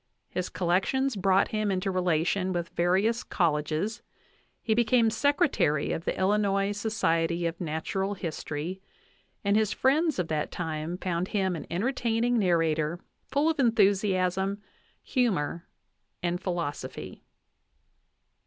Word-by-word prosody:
His 180 -1 -2
collections 190 +10 +1
brought 195 0 +3
him 215 -1 -1
into 190 0 0
relation 180 +1 +1
with 175 -1 -2
various 195 +7 +1
colleges; 160 +5 0 0.6
he 220 - 0
became 230 0 +3
secretary 270 - +2
of 165 - -3
the - - -1
Illinois 200 0 +2
Society 170 -5 0
of 165 +1 -3
Natural 185 +5 -2
History, 170 0 -5 0.6
and 200 0 +2
his 215 -1 +2
friends 305 +4 +2
of 180 -3 -1
that 155 -1 -1
time 160 0 -3
found 180 -1 -2
him 190 -4 0
an 160 - -7
entertaining 235 +3 0
nar 180 -4 +3
rator, 160 0 0 0.3
full 285 +3 +1
of 320 -2 0
enthusiasm, 195 -4 +2 0.4
humor, 185 - 0 0.6
and 175 +1 -1
philosophy. 175 -6 -4
190 Hz, 120 wpm, -28 LUFS, 170-220 Hz, 0.6 s, brought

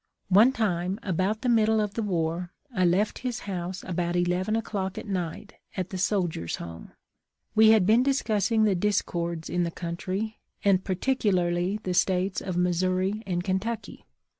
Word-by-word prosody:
One 210 +7 +6
time, 190 -5 -1
about 195 +4 -1
the - - 0
middle 220 -2 +4
of 210 -1 -1
the 230 - -2
war, 175 -3 -1 0.2
I 185 -4 +2
left 185 +5 +1
his 250 -2 -3
house 185 -1 -5
about 175 -1 -1
eleven 180 +4 +1
o'clock 200 -4 -3
at - - -5
night, 190 +1 -4 0.2
at 185 -1 -3
the 190 - -3
Soldiers' 175 - 0
Home. 85 -1 -9 0.6
We 220 0 +6
had 220 -4 +6
been 220 +5 +5
discussing 225 -5 +1
the 210 -2 +4
discords 170 -4 -1
in 180 - -1
the 170 - 0
country, 185 +6 -4 0.3
and 190 -2 +4
particularly 185 -3 0
the 180 - -1
States 185 +1 +1
of 185 -2 -3
Missouri 185 +3 +1
and 175 -2 -1
Kentucky. 200 +5 -3
190 Hz, 160 wpm, -27 LUFS, 175-215 Hz, 0.6 s, One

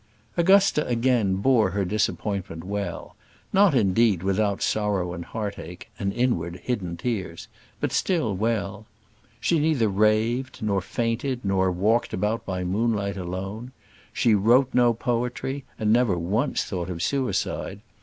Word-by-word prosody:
Augusta 190 -2 +4
again 120 -5 +2
bore 110 0 +3
her 100 +1 -1
disappointment 100 -4 -2
well: 100 +2 -5 0.4
not, 195 -5 +5
indeed, 105 -3 +3
without 100 +1 +1
sorrow 100 -5 0
and 85 -1 -6
heartache, 95 -6 -6
and 100 -2 -1
inward, 100 -8 0
hidden 90 -9 -3
tears; 95 -6 -4 0.3
but - - -1
still 140 - 0
well. 105 0 -2 0.5
She 170 - +2
neither 145 -8 +2
raved, 110 +6 +1
nor 100 -3 +1
fainted, 115 +6 -2
nor 95 -1 +2
walked 105 +7 +1
about 105 +4 -1
by 90 -1 -2
moonlight 100 +1 0
alone. 95 +7 -5 0.4
She 115 - +2
wrote 120 +6 +4
no 120 -2 +4
poetry, 125 +4 -2
and 110 0 +2
never 120 -6 +3
once 100 - 0
thought 90 -2 -4
of 85 -2 -4
suicide. 130 -6 -1
105 Hz, 135 wpm, -25 LUFS, 95-120 Hz, 0.5 s, not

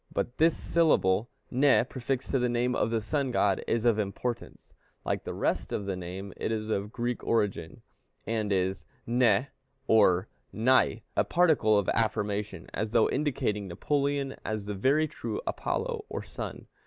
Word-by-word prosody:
But 120 - -3
this 165 +1 +4
syllable 115 - +2 0.2
Ne 135 +2 +4
prefixed 130 0 -3
to 135 - +2
the 125 0 +1
name 120 +1 +1
of - - +1
the 115 -1 0
sun 140 +5 -1
god 100 -5 +1
is 115 0 0
of 115 -2 +4
importance; 110 +4 -4 0.3
like - - -1
the - - -4
rest - - -1
of 100 - -2
the 100 -1 -2
name 90 +2 -7
it - - -2
is 110 -1 -2
of 100 0 -1
Greek 120 0 -3
origin, 100 -7 -1 0.4
and 110 -2 -1
is 95 0 0 0.2
νη 120 0 +3 0.4
or 100 -4 +4 0.2
ναι, 115 -2 +2
a - - +4
particle 155 -12 +3
of 100 - 0
affirmation, 105 -4 -1
as 110 +1 -3
though 115 -2 +4
indicating 130 -8 -1
Napoleon 140 +8 -1
as 110 -2 -3
the 105 - -3
very 140 +10 +2
true 155 - -5
Apollo, 465 -2 -2
or - - -4
sun. - - -7
115 Hz, 165 wpm, -29 LUFS, 100-130 Hz, 0.4 s, this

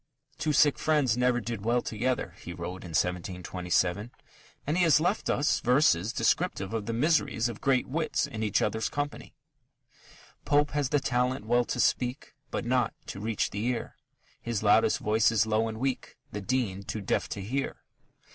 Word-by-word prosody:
"Two 155 +2 0
sick 145 -1 +4
friends 145 -7 +2
never 125 0 +2
did 115 -2 -5
well 120 +2 +1
together," 115 -4 -2
he 85 - -7
wrote 90 +1 -6
in 90 - -8
1727, 90 +2 -1 0.6
and 150 - 0
he 180 - +2
has 165 -4 +5
left 180 +6 0
us 145 - +2
verses 120 - +3
descriptive 95 +2 0
of 110 -2 -3
the - - -1
miseries 125 -2 +1
of 115 -3 -7
great 135 -2 +2
wits 155 +4 0
in 110 - -6
each 105 -3 +1
other's 110 0 -1
company: 145 0 -5 1.1
Pope 145 0 +2
has 145 -3 0
the 145 - +2
talent 125 -2 0
well 120 +2 +2
to - - -3
speak, 125 +3 0 0.2
But - - -3
not 125 -2 +1
to - - -7
reach 110 0 -1
the 100 +2 -3
ear; 125 -1 -3 0.5
His 115 -3 -3
loudest 110 +1 +4
voice 110 +2 +2
is 110 -1 +3
low 110 +1 +1
and 110 0 -5
weak, 135 0 -3
The 105 - -5
Dean 105 -3 -1
too 105 +2 -5
deaf 100 - -1
to 100 - -5
hear. 130 +8 -3
115 Hz, 175 wpm, -28 LUFS, 105-130 Hz, 1.1 s, has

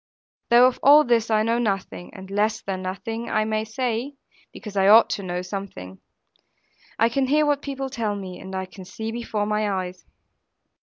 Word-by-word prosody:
Though 240 +1 +7
of 255 -1 +1
all 295 +2 +7
this 235 -3 +1
I 215 -1 +3
know 230 +2 +1
nothing, 195 -5 -3
and 190 -1 -10
less 215 +2 +1
than 190 -1 -4
nothing 225 +5 -5
I 215 0 +1
may 215 0 -1
say 245 +4 -3 0.4
(because 210 -4 -10
I 195 0 +3
ought 220 +3 +7
to - - -2
know 180 -1 -4
something); 180 - -7 1.0
I 230 - +4
can 265 +3 0
hear 300 +3 +3
what 290 -1 +1
people 275 -2 -4
tell 220 -5 -2
me; 190 -2 -7
and 190 0 -8
I 190 0 -3
can 185 +1 -12
see 220 +4 -6
before 225 -3 -3
my 210 0 0
eyes. 185 -2 -4
215 Hz, 190 wpm, -23 LUFS, 190-235 Hz, 1.0 s, Though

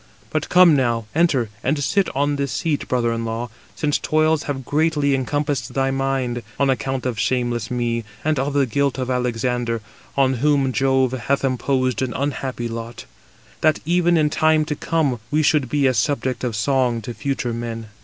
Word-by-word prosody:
But - - -2
come 180 -3 +7
now, 120 -4 +1
enter, 145 -9 +2
and 145 +4 +1
sit 190 +8 +1
on 145 +1 +1
this 140 -1 -2
seat, 155 -3 -1
brother 120 -2 +1
in 115 0 -3
law, 115 +1 -4 0.2
since 150 -2 0
toils 155 0 +2
have 135 -2 -3
greatly 150 -1 +1
encompassed 140 -1 -1
thy 135 0 +1
mind, 135 -3 -1 0.2
on 140 -1 +3
account 130 +1 -2
of 120 -4 -2
shameless 120 -2 0
me, 120 -1 -1 0.2
and 155 -3 +1
of 140 +2 -1
the 140 -1 +3
guilt 140 +3 0
of 130 0 -2
Alexander; 120 -1 -1 0.4
on 135 -1 +3
whom 140 -3 +3
Jove 130 -1 +2
hath 135 +2 -1
imposed 130 -1 0
an 130 -2 -2
unhappy 135 -3 -2
lot, 115 0 -7 0.6
that, 155 -1 +3
even 175 +1 +3
in 150 -1 +2
time 155 -1 +3
to 150 -1 -2
come, 145 -6 0
we 155 +1 +2
should 140 -3 +2
be 145 +2 +1
a 130 - +4
subject 130 +1 -1
of 120 -3 -1
song 120 0 +1
to 120 - -5
future 135 -2 -2
men." 115 -1 -5
135 Hz, 180 wpm, -21 LUFS, 120-145 Hz, 0.6 s, come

